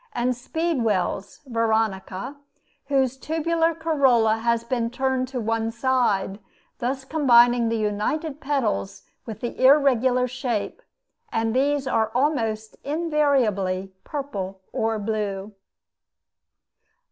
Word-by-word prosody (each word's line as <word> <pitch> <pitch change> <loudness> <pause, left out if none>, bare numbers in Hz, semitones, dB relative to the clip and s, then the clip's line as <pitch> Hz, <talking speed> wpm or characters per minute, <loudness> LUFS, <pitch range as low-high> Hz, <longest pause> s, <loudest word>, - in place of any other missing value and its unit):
and 245 +1 0
speedwells 235 - -1
(Veronica), 220 -2 -1 0.5
whose 265 -2 +1
tubular 325 +2 0
corolla 265 -9 +3
has 235 0 0
been 235 -1 -1
turned 260 0 -1
to 255 0 -4
one 225 0 -1
side, 230 -5 0 0.4
thus 265 +2 -2
combining 245 -5 +4
the 230 - 0
united 220 +9 -2
petals 100 - -1 0.2
with 220 - -7
the 240 +1 -4
irregular 260 -2 +4
shape; 250 - -3 0.5
and 225 +1 0
these 280 +1 +1
are 225 -4 +1
almost 225 -6 0
invariably 265 - 0
purple 200 -10 -5
or 225 0 0
blue. 205 -1 -3
240 Hz, 100 wpm, -24 LUFS, 220-275 Hz, 0.5 s, combining